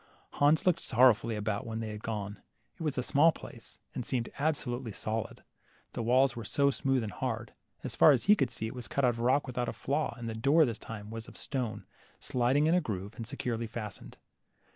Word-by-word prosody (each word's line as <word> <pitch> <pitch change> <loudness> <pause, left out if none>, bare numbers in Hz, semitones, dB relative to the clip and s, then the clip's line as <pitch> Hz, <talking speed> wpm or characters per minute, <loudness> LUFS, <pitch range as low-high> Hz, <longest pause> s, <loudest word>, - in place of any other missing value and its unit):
Hans 145 +2 +3
looked 180 -2 +3
sorrowfully 115 -2 +4
about 105 0 -2
when 110 0 -3
they 110 -1 -4
had 105 0 -7
gone. 105 -2 -4 0.3
It - - -16
was 150 -4 -1
a 125 - 0
small 150 +6 +5
place, 120 -6 -11 0.2
and 125 - -3
seemed 120 -2 -2
absolutely 130 -6 -1
solid, 110 +3 -4 0.5
the - - -3
walls 125 +2 +3
were 115 - -5
so 140 +7 +2
smooth 135 -2 +1
and 105 - -4
hard. 90 - -4 0.3
As - - -4
far - - +7
as 135 -5 +4
he 210 - +6
could 135 - +1
see, 110 -1 -4
it 110 - -4
was 125 -4 -7
cut 140 +7 +1
out - - +5
of 115 -1 -3
rock 130 +4 +2
without 125 -1 -2
a - - -4
flaw, 145 +2 -1
and 120 -1 -6
the 115 - -3
door 140 +8 +4
this 115 -4 -3
time 105 -1 -8
was 115 -1 -6
of - - -12
stone, 125 -6 -3 0.3
sliding 130 +4 +2
in 160 - +3
a 180 - +4
groove, 100 - -4
and 115 -3 -6
securely 120 -3 -3
fastened. 105 -2 -7
120 Hz, 220 wpm, -31 LUFS, 110-140 Hz, 0.5 s, far